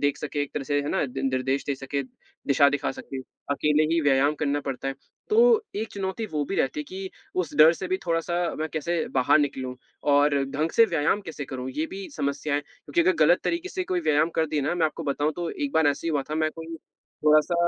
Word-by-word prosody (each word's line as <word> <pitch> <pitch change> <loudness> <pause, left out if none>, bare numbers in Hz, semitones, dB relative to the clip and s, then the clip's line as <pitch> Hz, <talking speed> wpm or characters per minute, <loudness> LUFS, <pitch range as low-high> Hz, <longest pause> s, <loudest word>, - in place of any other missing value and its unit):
देख 145 0 +1
सके, 145 -1 -2
एक 145 - -6
तरह 140 - -2
से 145 0 +1
है 145 - -4
ना, - - +1
दि 135 +1 -5
निर्देश 130 +1 0
दे 140 - 0
सके, 140 +1 -3 0.4
दिशा 140 +1 +5
दिखा 145 -1 -1
सके, 135 0 -7 0.3
अकेले 150 +2 +2
ही 170 - +3
व्यायाम 145 0 +3
करना 145 -1 +1
पड़ता 135 -1 -4
है, 135 - -3 0.4
तो 460 0 +5
एक 220 +1 -2
चुनौती 195 +3 -3
वो 150 -1 0
भी - - -2
रहती 135 +3 0
है - - -5
कि 190 0 -6 0.3
उस 160 -4 -5
डर 155 +2 +8
से 185 +2 -5
भी 185 - +1
थोड़ा-सा 165 +1 0 0.2
मैं 155 0 -2
कैसे 165 +1 -1
बाहर 130 +3 +4
निकलूँ 130 -3 -2 0.4
और 145 0 +4 0.2
ढंग 155 +4 -1
से 230 - +6
व्यायाम 170 +1 +1
कैसे 160 -6 -6
करूँ? 130 -1 -5
ये 155 +4 -2
भी 195 0 -6
समस्या 145 0 -1
है, 145 - +2
क्योंकि 145 +2 -3
अगर 185 +2 +4
गलत 175 +3 +4
तरीके 340 +2 -1
से 370 -1 -3
कोई 365 -1 -1
व्यायाम 155 - +2
कर 160 0 +2
दी 150 -1 -1
ना 145 +5 0
मैं 165 -2 +2
आपको 160 +2 -6
बताऊँ 145 +2 0
तो 175 -1 -2
एक 285 -2 -3
बार 160 -2 +3
ऐसे 145 +3 -2
ही - - +1
हुआ 145 -3 0
था, - - -1
मैं 155 0 +1
कोई 165 0 -8 0.5
थोड़ा-सा 155 +3 +5
150 Hz, 240 wpm, -26 LUFS, 140-170 Hz, 0.5 s, डर